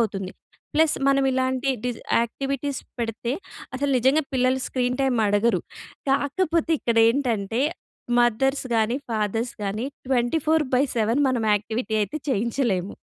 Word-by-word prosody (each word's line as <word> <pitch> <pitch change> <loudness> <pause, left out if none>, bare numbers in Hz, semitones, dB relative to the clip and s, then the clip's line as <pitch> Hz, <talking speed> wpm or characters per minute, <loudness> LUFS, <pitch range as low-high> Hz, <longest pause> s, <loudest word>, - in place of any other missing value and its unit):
అవుతుంది. 195 -4 -1 0.4
Plus 315 0 +4
మనవిలాంటి 265 -1 +2
డిజ్ 245 -2 -3 0.2
activities 275 +3 -2 0.2
పెడితే, 235 +1 -2 0.4
అసలు 280 +2 -1
నిజంగా 265 +6 +3
పిల్లలు 255 0 +2
స్క్రీన్ 250 -1 -1
టైమ్ 265 -3 +2
అడగరు. 205 -2 +2 0.5
కాకపోతే 315 +4 +1
ఇక్కడేంటంటే, 230 -2 +2 0.6
మదర్స్ 255 +4 +2
గాని, 225 +2 +2
ఫాదర్స్ 225 +2 -1
కానీ, 205 +4 -2 0.2
24/7 260 -2 +1
మనం 250 -3 0
యాక్టివిటీ 220 +1 -2
అయితే 210 +9 -2
చేయించలేము. 225 -5 0
245 Hz, 105 wpm, -24 LUFS, 225-270 Hz, 0.6 s, Plus